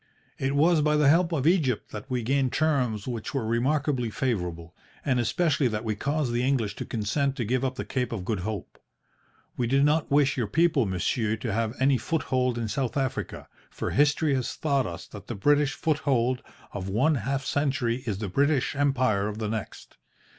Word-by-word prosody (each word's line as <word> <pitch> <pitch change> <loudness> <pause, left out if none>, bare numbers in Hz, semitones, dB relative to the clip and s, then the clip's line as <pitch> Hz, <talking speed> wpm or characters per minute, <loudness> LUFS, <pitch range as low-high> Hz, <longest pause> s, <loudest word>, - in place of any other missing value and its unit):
It 135 +1 0
was 160 +2 +4
by 150 0 +2
the 150 -2 +4
help 170 +3 +4
of 145 -5 -1
Egypt 155 - +2
that 105 +5 -8
we 125 -2 -1
gained 135 +1 +1
terms 130 -8 0
which 120 +2 -4
were 130 -5 0
remarkably 130 +2 0
favourable, 90 -9 -3 0.3
and 130 -3 +2
especially 150 +2 +1
that 110 -1 -2
we 110 -2 -1
caused 140 +3 -1
the 120 - +1
English 125 -6 0
to - - -4
consent 130 +6 -1
to 125 -5 -2
give 125 +4 0
up 130 -1 -1
the - - -4
Cape 125 -2 -2
of 100 -6 -4
Good 105 0 -1
Hope. 105 +1 -5 0.8
We 120 - -1
did 135 +3 +3
not 150 +1 +2
wish 145 0 +3
your 120 -4 0
people, 155 -3 +2
monsieur, 105 +4 0
to 110 -1 -4
have 115 +2 -1
any 135 -1 +3
foothold 130 -3 0
in 115 -1 -2
South 125 +5 -2
Africa, 135 -1 -3 0.2
for - - -4
history 145 +1 +3
has 130 -2 -2
taught 140 -5 +1
us 85 +1 -7
that 105 - -11
the 120 - -4
British 145 +7 +2
foothold 135 -5 +1 0.3
of 95 -1 -4
one 130 +11 +2
half 135 +2 -2
century 135 -5 0
is 105 -4 -1
the 105 0 -3
British 140 +7 +1
Empire 130 -8 +2
of 105 0 -5
the 110 -1 -3
next. 110 -2 -6
130 Hz, 195 wpm, -27 LUFS, 110-145 Hz, 0.8 s, was